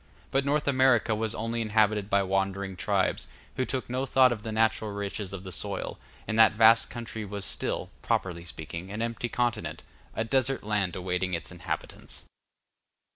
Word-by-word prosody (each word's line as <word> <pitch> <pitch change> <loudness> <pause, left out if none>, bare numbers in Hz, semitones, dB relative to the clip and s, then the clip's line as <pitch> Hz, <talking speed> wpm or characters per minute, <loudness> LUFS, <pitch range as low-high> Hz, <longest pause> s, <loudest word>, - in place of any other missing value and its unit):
But 135 0 +2
North 145 +1 +1
America 130 -4 +4
was 110 +1 -2
only 115 +1 -2
inhabited 105 -2 +2
by 100 -1 +3
wandering 95 0 -1
tribes, - - 0 0.3
who 130 - 0
took 130 -1 -3
no 130 +2 -2
thought 130 -1 +5
of 115 -3 -3
the 110 - -5
natural 110 0 +2
riches 100 -1 -4
of 95 -1 -6
the 95 - -7
soil, 100 +1 -2 0.3
and 110 0 0
that 110 -1 +7
vast 115 +1 +6
country 115 -2 -5
was 100 -1 -3
still, - - -2
properly 85 -2 -1
speaking, 85 +2 -7
an 110 +2 -2
empty 115 +1 -3
continent, 120 -2 -1 0.3
a 110 - 0
desert 130 +2 +1
land 105 -4 0
awaiting 90 0 -1
its 85 - -6
inhabitants. 90 - -6
110 Hz, 170 wpm, -28 LUFS, 95-115 Hz, 0.3 s, that